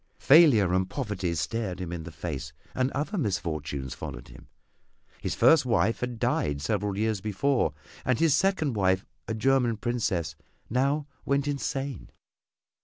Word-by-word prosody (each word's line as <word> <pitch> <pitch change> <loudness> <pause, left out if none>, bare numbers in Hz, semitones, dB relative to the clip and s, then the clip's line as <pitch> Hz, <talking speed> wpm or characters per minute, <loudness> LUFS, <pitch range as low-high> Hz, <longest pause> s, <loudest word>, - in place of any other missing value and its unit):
Failure 135 - +6
and 95 0 +1
poverty 100 -9 -2
stared 95 +1 -2
him 90 -2 -5
in 80 -2 -5
the 85 - -8
face, 75 -3 -5 0.2
and 130 0 +1
other 155 +9 -2
misfortunes 80 - -2
followed - - -8
him. - - -14 0.7
His - - -2
first 160 -3 +6
wife 115 -3 +1
had 125 -1 -3
died 75 -9 0
several 100 +5 -1
years 110 -2 0
before, 110 - 0 0.3
and 130 -2 +1
his 160 -3 +4
second 185 -8 +1
wife, 95 -2 +2 0.2
a 110 - -2
German 125 -1 +2
princess, 105 -10 -1 0.4
now 140 +4 +1 0.2
went 140 +1 0
insane. 140 - -3
110 Hz, 145 wpm, -27 LUFS, 90-135 Hz, 0.7 s, Failure